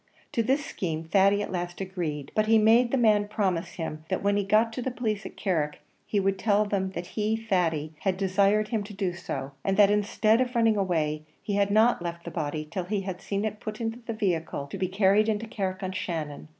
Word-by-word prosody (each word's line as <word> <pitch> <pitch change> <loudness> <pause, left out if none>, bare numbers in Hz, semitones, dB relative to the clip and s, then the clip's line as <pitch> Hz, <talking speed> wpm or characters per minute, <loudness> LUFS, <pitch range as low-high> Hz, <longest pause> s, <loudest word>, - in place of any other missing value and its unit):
To 230 - +1
this 270 +5 +1
scheme 160 -3 -3
Thady 195 +4 +3
at - - -6
last 175 -1 -4
agreed; 175 -7 -4
but 215 0 +1
he 225 0 +6
made 225 +3 +5
the 270 - +1
man 210 -4 +4
promise 190 -5 -1
him, 155 -3 -5
that 190 - -1
when 200 0 +2
he 205 - +1
got 215 +3 +3
to 250 - -4
the 260 - -1
police 220 -5 -2
at - - -14
Carrick 155 -7 -1 0.3
he 205 - +1
would 195 0 0
tell 210 0 +3
them 195 -2 -1
that 175 - -4
he, 215 +4 -1
Thady, 175 -8 0
had 190 -2 0
desired 200 +2 +2
him 220 -2 -1
to 205 0 -10
do 190 -3 -1
so; 140 -6 -5
and 195 0 0
that, 205 -1 +6
instead 215 +2 +2
of 250 0 -1
running 225 -2 +4
away, 160 -6 0 0.2
he 205 - -3
had 200 0 +2
not 220 +1 +4
left 170 0 -5
the - - -5
body 155 -1 -3
till 180 0 -3
he 200 +2 -1
had 190 -1 -5
seen 200 +1 -2
it 215 -1 -3
put 215 -1 -6
into 225 0 -3
the 230 - -2
vehicle, 170 -9 -1
to - - -4
be 185 - +1
carried 200 +3 +3
into 220 +1 -1
Carrick 195 -4 -3
on 185 - -2
Shannon. 155 -5 -4
200 Hz, 230 wpm, -27 LUFS, 175-215 Hz, 0.3 s, he